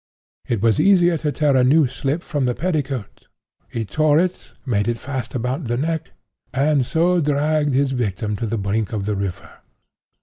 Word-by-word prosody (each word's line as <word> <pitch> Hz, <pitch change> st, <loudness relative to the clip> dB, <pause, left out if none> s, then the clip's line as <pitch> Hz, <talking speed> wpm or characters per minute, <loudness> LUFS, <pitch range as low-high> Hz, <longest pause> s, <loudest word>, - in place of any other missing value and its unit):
It 115 Hz, -3 st, -1 dB
was 115 Hz, -3 st, +3 dB
easier 175 Hz, -3 st, +4 dB
to 150 Hz, 0 st, -1 dB
tear 145 Hz, 0 st, +2 dB
a 130 Hz, -, +4 dB
new 145 Hz, +4 st, +5 dB
slip 135 Hz, +5 st, -2 dB
from 145 Hz, -3 st, -1 dB
the 125 Hz, -1 st, 0 dB
petticoat. 145 Hz, -, -3 dB, 0.4 s
He 115 Hz, -1 st, -3 dB
tore 155 Hz, +6 st, +2 dB
it, 180 Hz, +2 st, -1 dB, 0.2 s
made 105 Hz, -5 st, 0 dB
it 120 Hz, 0 st, 0 dB
fast 130 Hz, -1 st, -5 dB
about 125 Hz, +5 st, -2 dB
the 120 Hz, 0 st, -1 dB
neck, 160 Hz, +3 st, -2 dB, 0.5 s
and 140 Hz, 0 st, +3 dB
so 170 Hz, +6 st, +2 dB
dragged 150 Hz, -1 st, +1 dB
his 135 Hz, 0 st, +2 dB
victim 105 Hz, -4 st, -2 dB
to 115 Hz, -, -3 dB
the 115 Hz, +2 st, -2 dB
brink 105 Hz, +2 st, -1 dB
of 100 Hz, -3 st, -2 dB
the 105 Hz, 0 st, -1 dB
river. 100 Hz, -2 st, -5 dB
135 Hz, 180 wpm, -21 LUFS, 115-155 Hz, 0.5 s, new